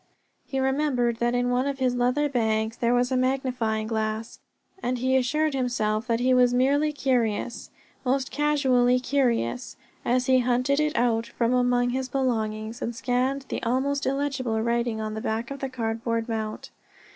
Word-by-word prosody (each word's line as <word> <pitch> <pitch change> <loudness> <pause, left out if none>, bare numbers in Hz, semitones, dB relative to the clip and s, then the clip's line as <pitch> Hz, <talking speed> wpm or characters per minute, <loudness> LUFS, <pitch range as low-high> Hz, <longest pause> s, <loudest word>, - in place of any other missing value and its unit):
He 270 - -2
remembered 265 -3 +1
that 240 +1 0
in 245 0 +1
one 250 +2 +1
of 280 -1 -2
his 255 -2 +1
leather 250 +4 +1
bags 220 -3 0
there 240 +1 +2
was 245 +1 +1
a - - +2
magnifying 255 -4 0
glass, 220 0 -3 0.4
and 250 +1 -1
he 260 +2 +1
assured 300 +4 +1
himself 240 -4 -1
that 230 -1 +1
he 255 +1 +3
was 250 -1 +4
merely 285 +4 +3
curious 245 -5 -1 0.3
most 265 0 0
casually 260 -4 +3
curious 250 - 0 0.3
as 250 +1 +1
he 260 0 +4
hunted 255 +3 +1
it 305 0 0
out 230 -1 +1
from 235 +1 0
among 245 -1 +2
his 260 +1 -2
belongings 225 -3 -2
and 235 - -3
scanned 255 +3 -1
the - - -3
almost 270 +4 0
illegible 265 -4 -1
writing 235 0 0
on 215 0 -3
the 220 - -4
back 225 +4 -2
of 275 - -5
the 270 - -3
cardboard 230 -1 -2
mount. 220 -2 -4
245 Hz, 170 wpm, -26 LUFS, 230-265 Hz, 0.4 s, was